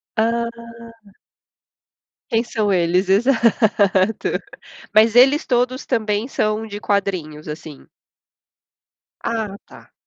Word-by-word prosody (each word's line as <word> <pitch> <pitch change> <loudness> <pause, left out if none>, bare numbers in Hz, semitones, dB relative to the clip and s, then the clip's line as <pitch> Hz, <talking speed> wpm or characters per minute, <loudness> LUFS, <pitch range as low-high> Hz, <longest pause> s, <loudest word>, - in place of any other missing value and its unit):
Hã. 230 +1 +1 1.8
Quem 225 +1 +1
são 215 -4 -1
eles? 180 +1 +1
Exato. 215 -3 +2 0.5
Mas 220 +1 +5
eles 270 +5 +5
todos 250 +1 0
também 215 +1 -1
são 215 -3 -1
de 205 -1 -7
quadrinhos, 185 -8 -2
assim? 150 -1 -9 1.3
Ah, 220 -4 -3
tá. - - -17
215 Hz, 90 wpm, -20 LUFS, 195-235 Hz, 1.8 s, Mas